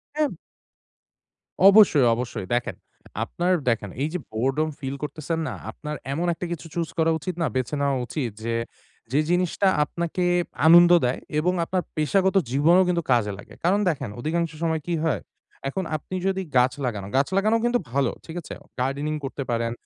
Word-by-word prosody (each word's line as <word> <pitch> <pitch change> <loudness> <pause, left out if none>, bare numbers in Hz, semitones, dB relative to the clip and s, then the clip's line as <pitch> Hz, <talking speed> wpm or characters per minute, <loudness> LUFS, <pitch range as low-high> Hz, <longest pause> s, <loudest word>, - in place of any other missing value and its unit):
হ্যাঁ। 305 -1 +2 1.4
অবশ্যই, 195 - +7
অবশ্যই। 120 -5 -4
দেখেন 120 0 -1 0.5
আপনার 180 +2 0 0.2
দেখেন 110 -3 -1
এই 150 - 0
যে 180 - -1
boredom 135 +7 0
ফিল 135 0 -4
করতেছেন 155 +2 -3
না? - - -4 0.2
আপনার 150 0 -6 0.2
এমন 170 +5 -1
একটা 175 - -5
কিছু 170 -1 -5
চুজ 170 -2 -2
করা 165 0 +3
উচিত 180 +5 -4
না, 165 - +2
বেছে 130 +3 -1
নেওয়া 140 -1 +1
উচিত 125 -3 -3
যে, 115 0 -1 0.6
যে 140 - +3
জিনিসটা 180 +2 +1 0.2
আপনাকে 170 +4 -3 0.4
আনন্দ 175 +1 +8
দেয় 125 - 0 0.2
এবং 180 +4 +1
আপনার 185 +1 -1
পেশাগত 190 +5 +2 0.2
জীবনেও 165 +7 +5
কিন্তু 170 -1 +1
কাজে 115 -4 +3
লাগে। - - -13
কারণ 185 +4 +3
দেখেন 140 -8 -3
অধিকাংশ 165 +4 -1
সময় 160 -1 0
কি 175 - -1
হয়? 145 - 0 0.5
এখন 190 +7 -3
আপনি 155 +5 -6
যদি 190 0 0 0.2
গাছ 125 +1 +4
লাগান, 105 -5 -3
গাছ 135 +1 +3
লাগানো 215 +3 +3
কিন্তু 240 0 +2
ভালো, 140 +1 +1
ঠিক 160 - -9
আছে? - - -8 0.3
গার্ডেনিং 140 +4 -1
করতে 140 +1 -4
পারেন। 115 0 0
155 Hz, 170 wpm, -24 LUFS, 130-175 Hz, 1.4 s, আনন্দ